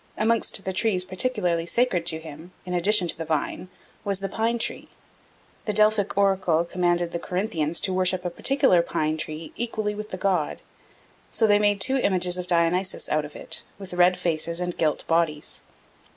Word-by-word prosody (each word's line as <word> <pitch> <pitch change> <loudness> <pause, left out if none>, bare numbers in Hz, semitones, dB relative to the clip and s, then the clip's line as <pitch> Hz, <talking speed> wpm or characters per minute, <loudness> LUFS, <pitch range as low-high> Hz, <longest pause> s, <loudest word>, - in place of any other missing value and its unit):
Amongst 220 -2 0
the 190 - -2
trees 190 -2 +1
particularly 185 -4 -1
sacred 185 -7 0
to 160 -2 +3
him, 160 +3 -11
in 180 - -5
addition 180 +1 +4
to - - -1
the 165 - -5
vine, 160 +3 -3 0.3
was 200 -1 0
the 195 - -3
pine 225 +4 -1
tree. - - -2 0.8
The 210 - -1
Delphic 215 -1 +2
oracle 190 -4 +2
commanded 175 -1 0
the 170 - -3
Corinthians 170 -5 0
to 190 - +1
worship 185 0 +1
a 175 - -2
particular 185 -4 +3
pine 155 -2 -1
tree 155 0 -6
"equally 220 -3 -2
with 210 +1 -7
the 185 - -5
god," 185 -5 -1 0.7
so 225 - +2
they 205 -1 +4
made 205 -1 +2
two 265 +6 +2
images 180 -6 +3
of 180 - -5
Dionysus 175 +2 +1
out 155 0 0
of 150 - -12
it, - - 0 0.2
with 195 -2 -9
red 180 +1 +4
faces 170 0 -1
and 180 -1 -3
gilt 155 -2 -1
bodies. 165 -3 -1
180 Hz, 180 wpm, -24 LUFS, 170-205 Hz, 0.8 s, addition